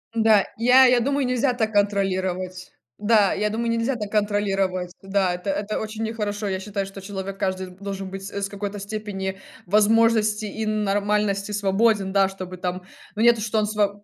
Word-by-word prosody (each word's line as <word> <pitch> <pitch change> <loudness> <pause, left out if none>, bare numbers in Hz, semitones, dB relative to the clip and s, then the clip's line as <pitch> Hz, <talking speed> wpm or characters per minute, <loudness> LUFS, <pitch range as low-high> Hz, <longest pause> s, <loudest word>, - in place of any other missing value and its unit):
М-да, 220 -3 +4
я 250 +3 +6
я 250 -1 +5
думаю, 275 +2 0
нельзя 250 +1 +1
так 220 -3 -1
контролировать. 185 -3 -1 0.3
Да, 210 -2 +3
я 210 +1 0
думаю, 230 +2 -2
нельзя 230 +3 0
так 210 -3 -5
контролировать. 195 -4 0
Да, 195 -2 +1
это 180 +3 -5
это 205 +2 -2
очень 220 +1 -5
нехорошо. 210 -2 -3
Я 190 -1 -2
считаю, 200 0 -3
что 195 0 -10
человек 195 0 -6
каждый 190 -1 -2
должен 195 +1 -6
быть 195 0 -7
с 200 0 -3
какой-то 205 0 -5
степени 195 -2 -5 0.3
возможности 215 +1 +3
и 220 +2 -4
нормальности 205 -1 0
свободен, 205 0 +2
да. 195 -1 +4
Чтобы 185 -1 -8
там 180 0 -3 0.3
ну, 215 - -2
нет, 235 0 +6
что 215 0 0
он 210 - +1
сво 205 -1 -1
205 Hz, 170 wpm, -23 LUFS, 195-220 Hz, 0.3 s, я